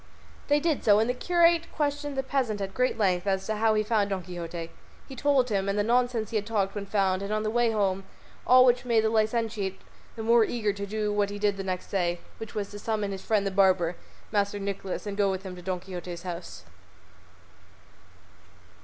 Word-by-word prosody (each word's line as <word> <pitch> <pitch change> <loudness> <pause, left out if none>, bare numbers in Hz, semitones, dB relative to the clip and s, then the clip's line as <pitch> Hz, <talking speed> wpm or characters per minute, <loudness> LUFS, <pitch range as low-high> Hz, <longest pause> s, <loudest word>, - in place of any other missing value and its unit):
They 290 +1 +4
did 315 -2 0
so, 205 -1 +6
and 220 +1 +2
the 250 - +1
curate 335 +4 +3
questioned 290 -1 -2
the 270 - 0
peasant 260 -6 -1
at 195 -1 -4
great 255 +3 +1
length 185 -3 +1
as 190 -1 0
to 215 -1 -2
how 220 0 +3
he 215 - +3
had - - -16
found 210 -3 +2
Don 190 -2 -2
Quixote. 170 -2 -6 0.4
He 270 - -9
told 265 -1 +2
him, 200 -2 0
and 200 - 0
the 205 - +2
nonsense 240 -1 +1
he 225 - +1
had 210 - -2
talked 200 -3 0
when 200 -1 -5
found 195 -2 +1
and 200 +1 -4
on 215 0 0
the 215 - -1
way 240 0 +2
home, 195 -3 0 0.4
all 255 0 +8
which 245 0 +3
made 230 -3 +2
the 220 - +1
licentiate 220 -3 0 0.4
the 225 - -5
more 230 +1 +5
eager 215 -2 -1
to 200 0 -5
do 210 0 -1
what 205 -1 +1
he 205 - -5
did 205 -1 +1
the 195 - -5
next 185 -1 -4
day, 175 -3 0 0.2
which 225 +1 -8
was 205 -2 -3
to 205 - -8
summon 210 -2 -2
his 190 -1 -5
friend 210 -2 +1
the 195 - -1
barber, 185 -3 +3 0.4
Master 205 -1 +1
Nicholas, 195 -1 -4
and 200 -1 -4
go 200 -1 +3
with 190 0 -3
him 185 -2 -7
to 180 - -10
Don 185 0 -2
Quixote's 180 -1 -7
house. 175 -1 -7
205 Hz, 225 wpm, -27 LUFS, 195-230 Hz, 0.4 s, all